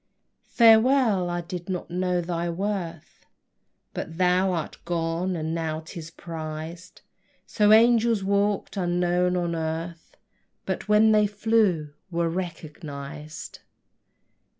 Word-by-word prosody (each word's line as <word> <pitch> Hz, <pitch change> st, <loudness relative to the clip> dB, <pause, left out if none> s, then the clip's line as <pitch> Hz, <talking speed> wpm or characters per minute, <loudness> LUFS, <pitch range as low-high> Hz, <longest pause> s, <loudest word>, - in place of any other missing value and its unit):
Farewell! 225 Hz, -4 st, +5 dB
I 175 Hz, 0 st, -2 dB
did 175 Hz, +1 st, -7 dB
not 180 Hz, -2 st, -4 dB
know 180 Hz, 0 st, 0 dB
thy 170 Hz, 0 st, -2 dB
worth; 170 Hz, -3 st, -4 dB, 0.7 s
But 165 Hz, -, -6 dB
thou 185 Hz, +1 st, +3 dB
art 165 Hz, -3 st, -4 dB
gone, 170 Hz, +2 st, -1 dB
and 160 Hz, -1 st, -3 dB
now 160 Hz, -1 st, -2 dB
'tis 160 Hz, 0 st, -8 dB
prized: 165 Hz, +1 st, -8 dB, 0.4 s
So 210 Hz, -1 st, +2 dB
angels 230 Hz, -1 st, +5 dB
walk'd 200 Hz, +1 st, 0 dB
unknown 180 Hz, 0 st, +1 dB
on 175 Hz, -1 st, -1 dB
earth, 165 Hz, +1 st, -5 dB, 0.5 s
But -, -, -3 dB
when 215 Hz, +1 st, +5 dB
they 210 Hz, -1 st, +4 dB
flew 205 Hz, -8 st, +1 dB, 0.2 s
were 170 Hz, -1 st, 0 dB
recognized! 155 Hz, -4 st, -7 dB
175 Hz, 110 wpm, -25 LUFS, 165-200 Hz, 0.7 s, Farewell